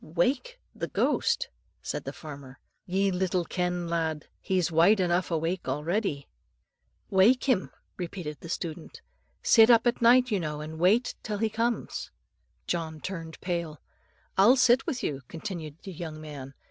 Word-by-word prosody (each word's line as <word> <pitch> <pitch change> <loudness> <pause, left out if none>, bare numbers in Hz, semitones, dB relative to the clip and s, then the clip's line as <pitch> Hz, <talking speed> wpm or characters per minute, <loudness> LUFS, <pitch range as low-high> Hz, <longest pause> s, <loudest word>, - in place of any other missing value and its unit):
"Wake 255 - -1
the - - -4
ghost!" - - +1 0.4
said - - -4
the - - -3
farmer, 140 -4 -10 0.3
"ye 195 +2 +1
little 185 -1 0
ken, 180 0 -2
lad. 160 -3 -1
He's 180 -3 0
wide 170 +6 +5
enough 180 0 +1
awake 165 +1 -1
already." 150 +2 -1 0.8
"Wake 205 +7 +5
him," 245 -9 +1 0.3
repeated 170 -5 -5
the 165 - -10
student; 165 -1 -5 0.4
"sit 225 0 +7
up 230 0 +6
at 240 0 +1
night, 245 +1 +5
you 205 - +2
know, 150 -3 -3
and 155 +1 -7
wait 210 +8 +3
till 210 -2 -3
he 220 +1 +1
comes." 230 +2 -2 0.6
John 160 -2 -3
turned 165 -2 -6
pale. 170 -4 -3 0.6
"I'll 225 +7 +7
sit 250 +2 +4
with 270 -7 -2
you," 140 -2 -2
continued 165 -4 -6
the 195 - -7
young 160 -2 -6
man. 140 -3 -9
175 Hz, 150 wpm, -28 LUFS, 160-215 Hz, 0.8 s, sit